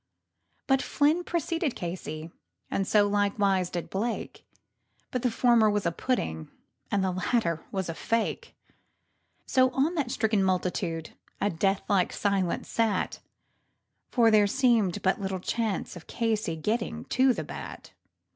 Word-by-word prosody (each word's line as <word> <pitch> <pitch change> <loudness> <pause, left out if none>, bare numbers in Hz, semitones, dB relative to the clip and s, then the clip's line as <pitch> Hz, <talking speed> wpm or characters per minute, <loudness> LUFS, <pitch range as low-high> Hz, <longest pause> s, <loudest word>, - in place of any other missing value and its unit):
But 270 -1 +3
Flynn 305 +5 +2
preceded 330 -4 -1
Casey, 165 -2 -5 0.4
and 195 -1 -1
likewise 205 -2 +3
so - - -16
did 175 -2 -4
Blake, 225 +5 -3 0.7
And 250 - 0
the 250 - +2
former 235 -2 +4
was 205 -2 0
a 170 - +2
pudding 80 - -2 0.4
and 200 -1 +1
the 190 - +1
latter 180 -3 0
was 190 -2 -2
a 165 - -3
fake; 230 +7 -2 0.9
So 255 -1 +4
on 290 +6 +2
that 290 -8 -1
stricken 220 -3 +1
multitude 180 -3 -1 0.3
a 205 - +1
death 195 +4 +1
like 195 -3 +2
silence 195 -4 0
sat, 225 -2 0 0.9
For 230 -3 +4
there 210 -1 +5
seemed 230 -6 +2
but 190 +2 +1
little 190 -1 -2
chance 220 +1 -2
of 175 - -11
Casey's 215 -8 -1
getting 230 +1 -1
to 260 0 +5
the - - -2
bat. - - -9
205 Hz, 140 wpm, -28 LUFS, 185-240 Hz, 0.9 s, there